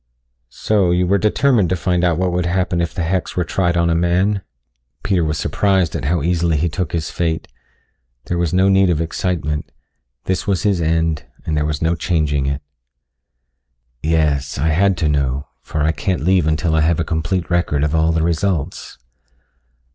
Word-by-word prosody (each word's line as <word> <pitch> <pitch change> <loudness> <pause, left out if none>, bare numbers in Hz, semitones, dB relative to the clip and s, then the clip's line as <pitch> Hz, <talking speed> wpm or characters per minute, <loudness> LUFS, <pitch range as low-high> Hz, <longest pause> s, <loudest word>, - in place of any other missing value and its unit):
"So, 100 - +1
you 90 +1 +2
were 100 +2 +2
determined 105 -1 +2
to 90 - +1
find 90 0 0
out 85 -3 +2
what 90 0 0
would 90 0 -1
happen 90 -1 0
if 85 - -1
the 85 - -3
hex 90 +2 -2
were 90 - +1
tried 85 +1 0
on 85 0 +2
a 85 - +2
man?" 90 +4 +1 0.6
Peter 95 -4 +1
was 75 0 -1
surprised 95 -5 +1
at - - -3
how 80 0 0
easily 85 -1 +1
he 85 +4 0
took 85 +1 -3
his 80 -2 -3
fate. 80 -2 -2 0.8
There 85 - -2
was 85 -3 0
no 95 +2 +3
need 95 -1 +4
of 80 -3 +1
excitement 80 -2 -2 0.5
this 95 +1 -2
was 100 -1 0
his 100 -4 +1
end 80 -1 0 0.2
and 80 - -1
there 75 0 0
was 75 0 -2
no 80 +1 +2
changing 75 -4 0
it. 70 +1 -3 1.4
"Yes, 75 -3 0
I 75 +5 +1
had 95 +4 +2
to 80 - 0
know, 70 -1 -1
for 75 - -3
I 80 - +3
can't 90 -2 -2
leave 90 -2 +3
until 80 +1 0
I 80 - +3
have 80 +1 +2
a - - +1
complete 85 +3 -2
record 85 -5 +1
of 75 0 0
all 80 0 +2
the 80 -1 0
results." 85 -1 -2
85 Hz, 190 wpm, -19 LUFS, 80-90 Hz, 1.4 s, need